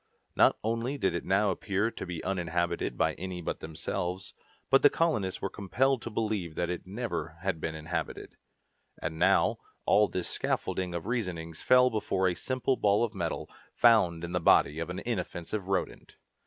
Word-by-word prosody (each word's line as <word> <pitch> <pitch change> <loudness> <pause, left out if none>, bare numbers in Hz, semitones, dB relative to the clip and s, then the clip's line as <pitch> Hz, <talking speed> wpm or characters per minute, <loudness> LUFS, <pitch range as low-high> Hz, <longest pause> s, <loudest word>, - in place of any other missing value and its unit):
Not - - +5
only 115 +5 -1
did 95 -9 +1
it 85 - -2
now 100 +1 +3
appear 100 +4 -1
to - - -6
be 85 -2 -5
uninhabited 85 -2 -1
by - - +2
any 90 0 -4
but 85 - -4
themselves, 85 +3 -4 0.4
but 135 - +6
the 145 - +8
colonists 135 - 0
were - - 0
compelled 125 +6 +1
to 115 - -5
believe 105 -7 -2
that 90 0 -1
it 90 0 -5
never 105 -5 -4
had 95 -4 -2
been 80 - -3
inhabited. 80 +3 -4 0.6
And 80 0 -4
now, - - +3 0.3
all 105 0 +5
this 90 -2 -3
scaffolding 90 -2 -2
of 85 - -4
reasonings 90 -9 -3
fell 125 0 +5
before 95 -3 0
a 90 - +1
simple 130 +6 -1
ball 105 +2 +3
of 115 - -1
metal, 85 -4 -3 0.3
found 95 -9 +4
in 85 - -4
the 90 - 0
body 75 -2 +4
of 85 - -3
an 90 - -4
inoffensive 95 -2 -4
rodent! 95 -1 -3
95 Hz, 175 wpm, -29 LUFS, 85-110 Hz, 0.6 s, the